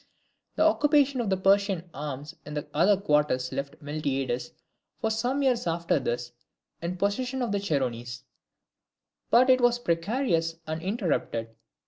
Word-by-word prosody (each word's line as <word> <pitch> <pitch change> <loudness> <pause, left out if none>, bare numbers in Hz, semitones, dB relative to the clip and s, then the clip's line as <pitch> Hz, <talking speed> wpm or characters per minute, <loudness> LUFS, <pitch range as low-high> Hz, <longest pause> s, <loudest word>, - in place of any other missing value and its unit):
The - - +3
occupation 290 -4 +3
of 220 - -2
the 190 - +2
Persian 195 -2 +2
arms 145 +2 -6
in 150 0 -5
other 195 +3 +4
quarters 150 -7 +1
left 140 +3 -5
Miltiades 135 -4 -2 0.5
for 220 - 0
some 245 +6 0
years 250 -8 +1
after 170 -1 +1
this 120 -1 -3 0.5
in 175 +2 -3
possession 250 +7 -1
of 235 - -2
the 200 - +1
Chersonese; 125 -10 -2 1.1
but 245 +2 +6
it 255 -1 +5
was 245 0 +4
precarious 170 -3 0
and 155 +1 -4
interrupted. 165 - -2
170 Hz, 135 wpm, -27 LUFS, 145-235 Hz, 1.1 s, but